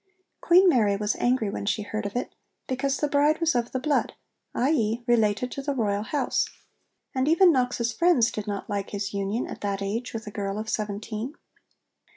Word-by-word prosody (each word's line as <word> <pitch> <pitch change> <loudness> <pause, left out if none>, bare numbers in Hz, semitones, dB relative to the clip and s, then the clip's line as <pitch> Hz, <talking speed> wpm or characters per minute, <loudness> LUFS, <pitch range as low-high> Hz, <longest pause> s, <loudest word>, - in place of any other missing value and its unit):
Queen 365 +2 +6
Mary 220 - +4
was 210 +1 -1
angry 245 -3 +1
when 200 - -4
she 215 0 0
heard 215 0 -3
of 200 - -9
it, 245 - -3 0.3
because 270 +1 -1
the 295 - 0
bride 290 +2 +3
'was 330 -1 +2
of 240 0 -1
the - - -1
blood,' 285 +3 0 0.4
i.e. 240 -4 +1
related 230 0 +2
to 275 - -4
the 280 0 -2
Royal 205 -4 0
house; 285 +7 0 0.6
and 260 +1 0
even 340 +3 +6
Knox's 250 -4 0
friends 305 -5 +3
did 215 -1 -5
not 200 -1 -4
like 200 -2 -3
his 200 -1 -4
union 200 +4 -1
at - - -8
that 200 -1 -2
age 225 +5 -3
with 225 -1 -6
a 210 - -7
girl 200 -1 -3
of 220 +1 -4
seventeen. 215 +5 -3
230 Hz, 190 wpm, -26 LUFS, 210-275 Hz, 0.6 s, Queen